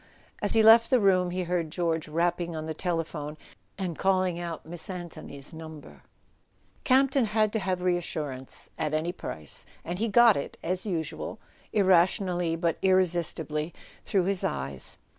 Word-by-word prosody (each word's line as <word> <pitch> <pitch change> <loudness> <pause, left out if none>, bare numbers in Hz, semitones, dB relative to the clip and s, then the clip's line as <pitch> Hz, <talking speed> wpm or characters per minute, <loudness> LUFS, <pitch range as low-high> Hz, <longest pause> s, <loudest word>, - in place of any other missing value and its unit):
As 205 - 0
he 225 -1 +5
left 225 +1 +8
the 255 - +5
room 185 -3 +3
he 180 +1 -2
heard 175 -2 -1
George 165 -1 -1
rapping 170 +1 0
on 155 0 -4
the 160 - -3
telephone 160 -3 -3 0.4
and 180 -4 -4
calling 185 -2 +2
out 170 -3 -5
Miss 165 +2 -4
Anthony's 170 -5 -8
number. 160 -2 -10 0.8
Campton 270 -1 +4
had 215 0 +1
to 220 - +1
have 185 -2 -2
reassurance 155 -7 -3
at 155 -1 0
any 160 +3 0
price; 75 - -5 0.2
and 175 +2 -4
he 225 - +1
got 230 0 +6
it, 140 - -4
as 185 +4 -2
usual, 165 -5 -3 0.3
irrationally 180 -3 +3
but 165 -1 -1
irresistibly, 170 -4 +1 0.3
through 190 -3 +1
his 195 0 0
eyes. 70 -1 -4
175 Hz, 150 wpm, -28 LUFS, 160-190 Hz, 0.8 s, left